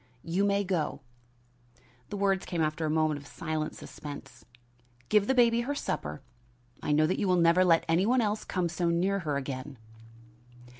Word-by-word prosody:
"You 180 +4 0
may 200 0 +2
go." 180 -5 -2 1.1
The 205 - -4
words 195 -1 +1
came 170 -3 0
after 155 +1 -1
a - - -1
moment 155 -1 +1
of 140 - -14
silent 155 -1 -3
suspense. 135 -5 -10 0.7
"Give 210 -1 +4
the 265 - +2
baby 235 -1 +4
her 280 +4 -2
supper 75 - -4 0.6
I - - -1
know 155 +1 +4
that 180 - 0
you 200 - 0
will 180 - +4
never 170 +1 +5
let 165 -2 +4
any 170 +5 +2
one 255 +2 +3
else 210 -2 0
come 180 -2 -1
so 170 0 -1
near 185 +4 +1
her 150 -5 -2
again." 135 0 -5
170 Hz, 180 wpm, -29 LUFS, 155-200 Hz, 1.1 s, never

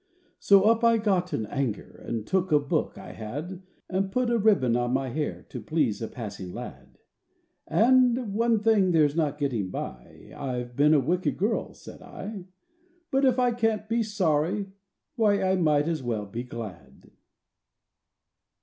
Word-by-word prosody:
So 200 -1 +5
up 225 +2 +3
I 230 0 +5
got 190 -4 0
in 110 - -2
anger, 130 -2 -4
And 115 -2 -3
took 190 +3 0
a 150 - +6
book 145 - -2
I - - -9
had, 150 - -6 0.3
And 190 +1 -1
put 250 +2 0
a 235 - +2
ribbon 195 - +3
on 120 0 0
my 135 0 0
hair 150 +4 -4
To - - -7
please 145 -10 0
a 110 - -2
passing 100 -6 -7
lad. - - -9 0.7
And, 245 -2 +3
"One 230 0 +2
thing 210 -5 +3
there's 150 -3 +3
no 155 -3 +1
getting 135 -9 -2
by— 65 -8 -8
I've 125 -3 -4
been 150 +3 +5
a - - +5
wicked 180 +6 0
girl," 210 +4 -1
said - - -12
I; 200 -4 -8 0.7
"But 270 +1 +3
if 255 -1 +3
I 250 -1 +3
can't 225 -2 0
be 230 +1 +1
sorry, 195 -1 0 0.5
why, 205 -3 +3
I 190 0 +2
might 150 -3 +2
as 165 -3 -1
well 115 -4 -2
be 115 +5 -6
glad!" 115 -6 -10
175 Hz, 165 wpm, -26 LUFS, 130-215 Hz, 0.7 s, a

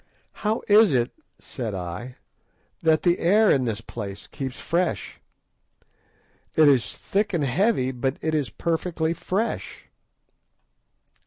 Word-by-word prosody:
"How 215 +1 0
is 210 -5 +6
it," 120 -1 +1 0.3
said 115 -6 -5
I, 95 +8 -6 0.7
"that 160 -1 +3
the 175 0 +3
air 210 +5 +4
in 130 -2 +2
this 115 -2 -2
place 100 -2 -7
keeps 135 -2 -6
fresh? 175 +1 -2 1.3
It 155 -1 +6
is 135 -5 +2
thick 205 -1 -1
and 160 - 0
heavy, 140 - +1
but 130 +2 -2
it 160 0 -2
is 145 -6 0
perfectly 165 - -1
fresh." 200 +6 -3
155 Hz, 125 wpm, -24 LUFS, 125-180 Hz, 1.3 s, is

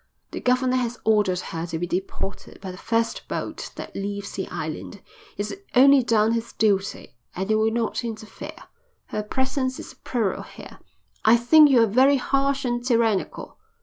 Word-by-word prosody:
"The - - -5
governor 255 0 +2
has 245 -1 -2
ordered 205 -4 +2
her 165 +1 -5
to 165 -1 -3
be 175 - -2
deported 190 +2 -5
by 190 -1 -6
the 180 - -10
first 230 0 -1
boat - - -5
that - - -8
leaves 200 0 -4
the 190 - -4
island. 160 +6 -6 0.4
He's 205 +1 -3 0.2
only 275 +2 +7
done 225 -2 +2
his 230 0 -2
duty 200 - 0 0.2
and 190 +4 -2
I - - +4
will 215 +1 +3
not 230 +1 -1
interfere. 220 -2 -8 0.5
Her 210 - -2
presence 260 +4 -2
is - - -9
a - - -28
peril 225 -7 -2
here." - - -12 0.4
"I 225 +2 +6
think 295 +6 +6
you're 240 -4 +6
very 260 +6 +4
harsh 275 +1 0
and 240 -1 -1
tyrannical." 230 -5 0
225 Hz, 170 wpm, -24 LUFS, 200-255 Hz, 0.5 s, only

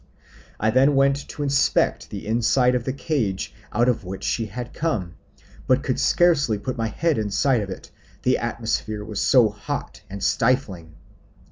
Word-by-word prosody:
I 110 +1 +2
then 135 +4 +4
went 140 +1 +2
to 145 - -5
inspect 140 0 +1
the 100 - -7
inside 120 +3 +2
of 125 -2 -1
the 130 - -1
cage 130 -9 -2 0.2
out 120 +4 +2
of 125 -4 +1
which 95 +1 -7
she 115 -2 -1
had 120 +4 -7
come, 105 - -2 0.5
but 130 +1 +3
could 130 - -1
scarely 145 -11 +3
put 120 +5 -4
my 115 -1 -1
head 155 +5 0
inside 110 +4 +1
of 100 - -5
it, 95 - -8 0.3
the 125 - +2
atmosphere 110 -2 -3
was 105 -2 -4
so 125 -5 +5
hot 110 +5 -6
and 100 +1 -7
stifling. 100 - 0
120 Hz, 165 wpm, -23 LUFS, 105-135 Hz, 0.5 s, so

